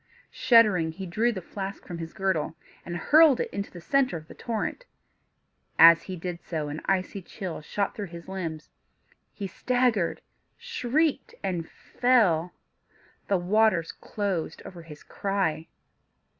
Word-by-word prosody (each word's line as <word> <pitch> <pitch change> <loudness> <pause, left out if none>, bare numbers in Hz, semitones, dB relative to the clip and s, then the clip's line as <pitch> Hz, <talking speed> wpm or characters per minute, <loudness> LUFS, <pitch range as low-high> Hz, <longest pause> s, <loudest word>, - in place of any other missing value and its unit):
Shuddering 205 -9 +4
he 190 +3 -7
drew 220 +7 +1
the 190 -6 -6
flask 195 +2 -6
from 175 -2 -7
his 165 0 -6
girdle, 190 -5 -1 0.3
and 175 0 -5
hurled 305 - +6
it - - -2
into 200 0 -4
the 175 - -11
centre 270 - +1
of 155 0 -12
the - - -11
torrent. 235 - -4 0.9
As 165 0 +9
he 185 - -6
did 175 0 -5
so, 155 -3 -4
an 150 +2 -5
icy 195 +1 0
chill 180 -2 -6
shot 200 +6 -2
through 205 -2 -5
his 170 0 -10
limbs: 165 -5 -5 0.6
he 200 - -6
staggered, 235 -1 0 0.4
shrieked, 315 - -1
and 175 -4 -2
fell. 195 -10 +2 0.8
The 195 - +2
waters 185 -2 +2
closed 190 -6 -4
over 175 -2 -9
his 155 -2 -12
cry. 190 -6 -2
190 Hz, 145 wpm, -27 LUFS, 165-220 Hz, 0.9 s, As